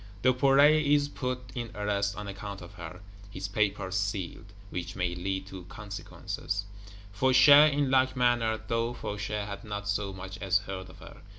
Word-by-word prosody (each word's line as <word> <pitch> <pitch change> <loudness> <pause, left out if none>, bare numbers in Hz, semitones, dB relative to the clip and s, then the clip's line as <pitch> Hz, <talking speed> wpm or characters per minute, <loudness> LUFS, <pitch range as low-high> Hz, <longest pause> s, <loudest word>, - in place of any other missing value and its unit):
Duperret 140 +4 +5
is 145 0 +3
put 125 -3 -4
in 120 -2 -4
arrest, 100 -1 -1
on 105 0 -6
account 100 0 -6
of 90 +3 -12
her; 90 -1 -9 0.3
his 95 0 -5
Papers 100 -2 -1
sealed, 100 +1 -3 0.2
which 90 +1 -5
may 90 -2 -1
lead 95 +2 -3
to 95 -2 -9
consequences. 100 0 -5 0.5
Fauchet, 130 +7 +7
in 140 -1 0
like 130 0 +3
manner; 120 -3 +2
though 115 +1 0
Fauchet 105 -1 -4
had 100 +2 -7
not 105 -2 -5
so 100 -1 -1
much 95 0 -8
as 95 -1 +2
heard 95 -2 -7
of 90 - -14
her. - - -12
105 Hz, 165 wpm, -29 LUFS, 95-125 Hz, 0.5 s, Fauchet